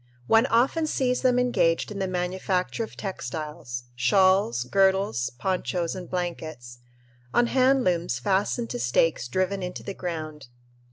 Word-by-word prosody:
One 225 - +4
often 270 +8 +2
sees 250 -4 0
them 250 -1 +3
engaged 230 -9 +1
in 205 - -5
the 190 - -1
manufacture 185 +3 -1
of 220 - -9
textiles 155 -9 -5
shawls, 160 -1 +3
girdles, 190 - +2
ponchos, 180 +1 -1
and 185 -2 -8
blankets 155 -9 -5 0.6
on 240 - +5
hand 260 +1 +3
looms 170 - 0
fastened 200 - 0
to - - -3
stakes 125 +4 +1
driven 185 +7 -1
into 180 0 -5
the 195 - -5
ground. 155 -6 -6
185 Hz, 135 wpm, -26 LUFS, 155-205 Hz, 0.6 s, on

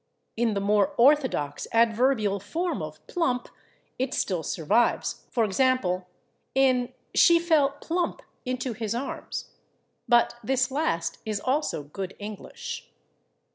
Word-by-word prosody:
In 230 -2 +1
the - - +1
more 210 +8 +2
orthodox 255 - +3
adverbial 225 -2 +3
form 340 - -2
of - - -8
/plump/ 255 -9 -1 0.5
it 260 +1 -1
still 180 -4 0
survives, 165 +9 0
for 230 -3 +2
example, 195 -5 +1 0.5
in 255 -2 +3 0.2
"she 340 -1 +6
fell 305 -5 +2
/plump/ 345 +1 -2 0.2
into 255 -1 -2
his 220 0 -3
arms." 260 +3 -5 0.6
But 240 0 +4
this 265 +3 +1
last 170 - -1
is 215 -2 -2
also 260 - -1
good 185 +6 -6
English. 205 -1 -7
240 Hz, 120 wpm, -26 LUFS, 205-270 Hz, 0.6 s, she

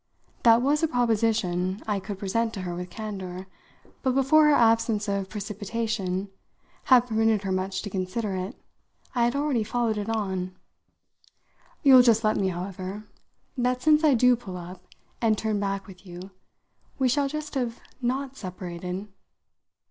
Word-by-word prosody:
That 230 0 +6
was 290 +3 +2
a 325 - +3
proposition 215 - +1
I 205 -2 0
could 195 +1 -6
present 225 +4 -1
to 195 - -4
her 180 -1 -4
with 180 +1 -6
candour, 190 -3 -6 0.6
but 260 -1 0
before 280 +3 +5
her 295 - +5
absence 225 -3 +3
of 200 -1 -2
precipitation 205 -2 -3 0.6
had 250 -2 +6
permitted 220 -3 +1
her 195 - -2
much 185 0 -2
to 205 - -5
consider 190 +2 -2
it 185 +6 -4 0.6
I 240 -2 +2
had 240 - 0
already 280 -5 +1
followed 230 -1 -1
it 205 +1 -4
on. 190 -4 -2 1.3
"You'll 265 -3 +9
just 230 -2 +4
tell 215 0 +3
me, 195 - 0
however, 185 +2 -5 0.5
that 250 0 0
since 310 0 +5
I 295 -4 +5
do 250 +1 +5
pull 195 -6 -8
up 180 +1 -10 0.3
and 220 -2 +3
turn 215 -1 -1
back 195 -1 -2
with 185 -2 -14
you 180 +1 -10 0.7
we 265 - +2
shall 280 +3 +2
just 305 +1 -5
have 245 -4 -2 0.2
not 265 +2 -2
separated. 180 -1 -6
215 Hz, 155 wpm, -26 LUFS, 190-245 Hz, 1.3 s, You'll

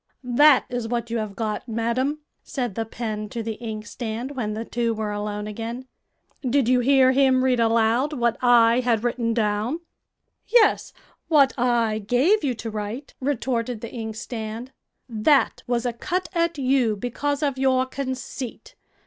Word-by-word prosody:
"That 265 +3 +5
is 245 -2 -3
what 235 0 -3
you 230 - 0
have 210 -2 -5
got, 215 +2 -3
madam," 240 +6 -1 0.2
said 245 -6 -4
the 225 +3 -2
pen 215 -2 -4
to 230 +1 -4
the 225 0 -3
inkstand, 225 +2 -5
when 235 -6 -3
the 225 +1 -4
two 230 -1 -1
were 215 -1 -3
alone 210 0 -3
again. 230 +4 -5 0.6
"Did 260 -1 +1
you 250 0 +4
hear 260 +1 +5
him 260 -1 +3
read 255 -2 +2
aloud 230 +4 +2
what 235 -4 +1
I 240 -1 +5
had 235 -3 +1
written 240 -1 0
down?" 220 +7 0 0.7
"Yes, 475 -2 +3 0.4
what 280 -4 +5
I 235 -3 +1
gave 260 - +2
you 260 -4 0
to 225 0 -6
write," 215 +6 -5
retorted 250 -4 -2
the 230 - -7
inkstand. 225 +1 -6 0.4
"That 250 +5 +2
was 240 0 0
a 245 - 0
cut 365 +10 -3
at 335 -2 0
you 260 -5 +2
because 280 +7 -2
of 280 -3 -1
your 260 -1 +3
conceit. 260 - -6
240 Hz, 155 wpm, -24 LUFS, 225-265 Hz, 0.7 s, That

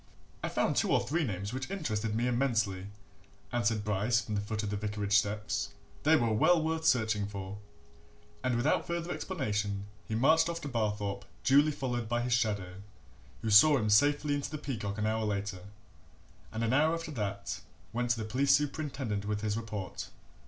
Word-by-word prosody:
"I - - -1
found - - +1
two - - +2
or - - +5
three 160 +5 0
names 100 -3 -3
which 130 +3 -4
interested 115 - -2
me 115 +2 +1
immensely," 115 -7 0 0.6
answered 115 -3 +1
Bryce 105 +3 +1
from 115 -2 -5
the 100 - 0
foot 105 +1 -3
of 105 - -2
the - - -1
vicarage 105 0 -1
steps. 105 0 0 0.3
"They 155 +2 +5
were 120 -7 +2
well 160 +9 +4
worth 160 0 -1
searching 110 -4 +2
for." 100 0 -6 0.8
And 130 -1 +1
without 130 +6 +1
further 170 0 -2
explanation 105 - -2 0.2
he 110 - -2
marched 160 +7 +4
off 170 0 -3
to 145 - -5
Barthorpe 105 -5 -2 0.2
duly 145 +3 +5
followed 120 -5 -3
by 120 0 +1
his 125 0 0
shadow, 100 -5 -1 0.6
who 110 - 0
saw 145 +8 +8
him 105 -4 0
safely 145 +6 +4
into 145 -1 -2
the 155 - -4
Peacock 105 -9 -4
an 105 - -1
hour 110 +1 0
later 100 -3 -3 0.9
and, 110 +1 -3
an 115 +1 +1
hour 155 +4 +4
after 165 -1 -5
that, 100 -6 -3 0.3
went 120 +1 -1
to 120 - +2
the 110 - -3
police 135 +5 +3
superintendent 135 -8 -2
with 105 0 -2
his 105 -1 -1
report. 105 -5 -5
110 Hz, 180 wpm, -31 LUFS, 105-140 Hz, 0.9 s, saw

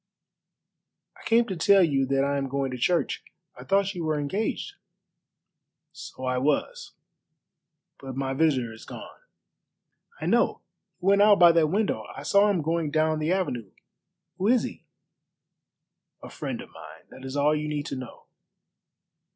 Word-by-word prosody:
"I - - -17
came 230 +1 +4
to 195 - -4
tell 195 +3 +5
you 135 -5 +1
that 135 0 +1
I 140 0 0
am 135 - -3
going 135 0 -2
to 125 - -5
church. 175 +7 0 0.3
I - - -11
thought 195 0 +1
you 175 -3 -5
were 155 -1 0
engaged." 190 +10 -3 1.2
"So 130 - -9
I 130 0 0
was; 480 - -1 1.1
but 135 -2 -8
my 135 0 -2
visitor 135 -6 +1
is 110 - -13
gone." - - -11 1.0
"I - - -5
know; - - +2 0.4
he 180 - -9
went 200 +1 +5
out 205 -1 +6
by 175 -1 +8
that 165 -2 +3
window. 200 +6 -1
I - - -7
saw 200 +1 +4
him 180 -6 0
going 165 0 -1
down 155 +1 +1
the 155 +2 -1
avenue. 125 - -2 0.7
Who 190 - 0
is 240 0 +4
he?" - - -7 1.4
"A - - -9
friend - - -5
of - - -13
mine. - - -13
That 130 - -13
is 135 +1 -6
all 150 +2 +3
you 150 0 -3
need 150 -1 -3
to - - -4
know. 130 -2 -9
155 Hz, 165 wpm, -26 LUFS, 135-195 Hz, 1.4 s, by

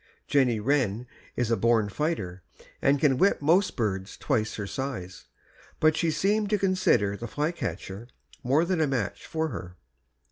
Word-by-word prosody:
Jenny 125 -6 +3
Wren 125 -2 0 0.3
is 120 -2 0
a - - +4
born 115 0 +2
fighter, 100 - -3 0.4
and 140 +1 +3
can 135 -3 +3
whip 195 - +4
most 170 +7 +3
birds 100 -3 -2
twice 110 -6 -1
her 105 - -4
size, 100 -6 -5 0.5
but 155 0 +4
she 165 0 +1
seemed 205 +5 +1
to 210 - +2
consider 185 - +2
the 120 +3 -6
flycatcher 115 - -4 0.4
more 140 +7 +3
than 175 -2 0
a 155 - +3
match 125 -7 -3
for 160 0 -1
her. 90 -7 -7
130 Hz, 155 wpm, -27 LUFS, 105-160 Hz, 0.5 s, a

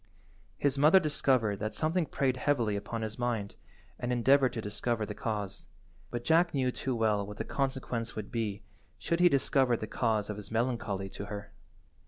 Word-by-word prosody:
His 140 -1 +1
mother 155 +6 +7
discovered 130 - +1
that 110 +1 -3
something 160 +1 +1
preyed 130 -1 0
heavily 120 -6 +1
upon 110 +3 -4
his 110 +1 -5
mind, 115 -5 -1 0.5
and 120 - -2
endeavoured 130 +2 +4
to - - -3
discover 110 +1 -2
the 105 - -5
cause, 105 -3 -4 0.4
but 120 -1 -4
Jack 165 +2 +3
knew 130 -2 +2
too 130 0 -2
well 110 -3 +2
what 105 +1 -8
the - - -2
consequence 130 -4 -2
would 105 -2 -6
be 105 -3 -2 0.3
should 170 0 -1
he 175 0 +7
discover 135 -3 +2
the 110 - -4
cause 110 -1 0
of 105 - -4
his 105 -2 -8
melancholy 110 -4 -1
to 100 - -7
her. 100 0 -7
115 Hz, 180 wpm, -31 LUFS, 105-135 Hz, 0.5 s, mother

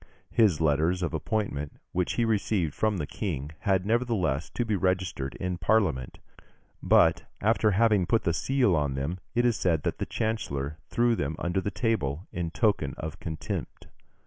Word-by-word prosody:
His 105 -9 +4
letters 80 +4 +2
of 85 - -2
appointment, 80 -4 -2 0.2
which 90 -1 0
he 120 - +1
received 100 -7 0
from 110 -2 0
the 75 - -2
King, 75 -4 -4
had, 95 -2 +1
nevertheless, 110 - 0
to 120 - 0
be 110 -2 0
registered 90 -7 -1
in 90 -1 -3
Parliament; 90 - +1 0.6
but, - - +4
after 110 0 +3
having 105 -2 +3
put 115 +3 +2
the 85 - +1
seal 125 0 +2
on 70 -3 0
them, 70 +7 -3 0.2
it 120 +1 +3
is 120 -2 +2
said 80 -5 +1
that - - -2
the - - -2
chancellor 75 -10 -2
threw 120 0 +2
them 75 -4 -2
under 90 +2 -1
the 105 - -2
table, 95 - -1
in 85 -1 -3
token 95 - +1
of 80 -1 -6
contempt. 80 -3 -5
90 Hz, 170 wpm, -28 LUFS, 80-110 Hz, 0.6 s, His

